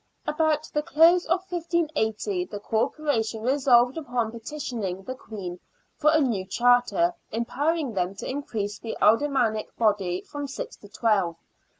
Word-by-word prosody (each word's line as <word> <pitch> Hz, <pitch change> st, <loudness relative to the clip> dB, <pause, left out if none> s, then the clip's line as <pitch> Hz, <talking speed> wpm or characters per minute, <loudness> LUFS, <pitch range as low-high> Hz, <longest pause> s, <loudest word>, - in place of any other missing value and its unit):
About 310 Hz, 0 st, +1 dB
the 300 Hz, -, +1 dB
close 335 Hz, +3 st, +5 dB
of 355 Hz, +3 st, +1 dB
1580 295 Hz, -, -1 dB
the 205 Hz, +2 st, -7 dB
Corporation 225 Hz, 0 st, -1 dB
resolved 255 Hz, +1 st, +4 dB
upon 245 Hz, -7 st, -2 dB
petitioning 230 Hz, -6 st, -5 dB
the 255 Hz, -, -5 dB
Queen 195 Hz, -8 st, -7 dB, 0.4 s
for 305 Hz, -, +3 dB
a 315 Hz, -, +4 dB
new 235 Hz, -10 st, +1 dB
charter, 245 Hz, -, +3 dB, 0.2 s
empowering 280 Hz, +5 st, -1 dB
them 185 Hz, 0 st, -1 dB
to -, -, -6 dB
increase 220 Hz, -7 st, -3 dB
the 225 Hz, -, -5 dB
aldermanic 230 Hz, -1 st, +2 dB
body 200 Hz, -5 st, +1 dB
from 290 Hz, -1 st, -6 dB
six 270 Hz, -, -6 dB
to 205 Hz, -, -15 dB
twelve. 200 Hz, -6 st, +1 dB
245 Hz, 135 wpm, -26 LUFS, 210-300 Hz, 0.4 s, close